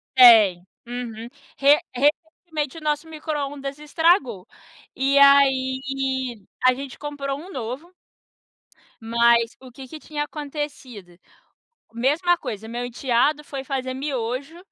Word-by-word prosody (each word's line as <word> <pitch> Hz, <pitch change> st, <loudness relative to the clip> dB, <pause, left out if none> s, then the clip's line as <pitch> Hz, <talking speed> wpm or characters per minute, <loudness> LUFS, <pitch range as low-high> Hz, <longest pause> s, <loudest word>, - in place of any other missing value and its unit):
Tem, 215 Hz, -8 st, +7 dB, 0.2 s
uhum, 235 Hz, -2 st, -6 dB, 0.3 s
re 285 Hz, +2 st, +5 dB
recentemente 305 Hz, +2 st, -1 dB
o 325 Hz, -, -9 dB
nosso 300 Hz, +1 st, -1 dB
microondas 290 Hz, -3 st, -5 dB
estragou. 300 Hz, -, +1 dB, 0.5 s
E 275 Hz, +1 st, +1 dB
aí, 265 Hz, -3 st, +2 dB, 0.2 s
a 255 Hz, -, +6 dB
gente 270 Hz, 0 st, -8 dB
comprou 285 Hz, -2 st, -4 dB
um 360 Hz, +5 st, -11 dB
novo 265 Hz, +6 st, -6 dB, 1.1 s
mas, 235 Hz, 0 st, +3 dB
o 260 Hz, -1 st, -13 dB
que 265 Hz, +1 st, -11 dB
que 310 Hz, +4 st, -10 dB
tinha 295 Hz, -1 st, -4 dB
acontecido? 280 Hz, -, -7 dB, 0.8 s
Mesma 300 Hz, +9 st, +2 dB
coisa, 215 Hz, 0 st, -6 dB
meu 240 Hz, +2 st, -4 dB
enteado 255 Hz, +4 st, 0 dB
foi 275 Hz, -2 st, -7 dB
fazer 260 Hz, -1 st, -3 dB
miojo, 265 Hz, +2 st, -4 dB
270 Hz, 115 wpm, -23 LUFS, 245-295 Hz, 1.1 s, Tem